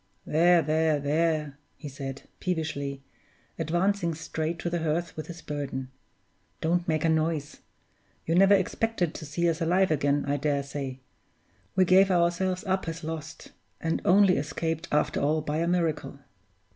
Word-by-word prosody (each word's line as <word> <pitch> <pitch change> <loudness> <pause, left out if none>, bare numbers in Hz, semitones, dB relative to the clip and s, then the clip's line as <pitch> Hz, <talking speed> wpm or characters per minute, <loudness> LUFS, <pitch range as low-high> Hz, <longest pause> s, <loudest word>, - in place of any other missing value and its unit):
"There, 170 +2 +4
there, 155 0 +2
there!" 150 0 0 0.2
he 150 - -8
said, 135 -1 -7 0.2
peevishly, 140 -6 -3 0.6
advancing 175 +2 0
straight 160 +1 -3
to 170 - -3
the 170 -1 -1
hearth 165 +2 -1
with 155 - -6
his 170 -2 -9
burden; 135 -3 -4 0.7
"don't 170 +2 0
make 155 -1 +1
a - - +4
noise. 155 -2 0 0.7
You 165 - 0
never 195 +3 +6
expected 190 -2 0
to 155 - -7
see 170 +4 0
us 165 0 0
alive 180 +2 +3
again, 145 -1 +1
I 145 +1 +1
dare 140 -1 0
say. 135 -2 -6 0.7
We 190 -1 +5
gave 190 +2 +5
ourselves 180 +1 +1
up 190 -3 -1
as 165 0 -5
lost, 160 0 -7 0.3
and 165 0 -1
only 190 0 +5
escaped 160 +3 -2
after 150 0 +1
all 150 +2 +2
by 150 0 -2
a 165 +1 0
miracle." 170 -5 -1
160 Hz, 155 wpm, -27 LUFS, 150-175 Hz, 0.7 s, never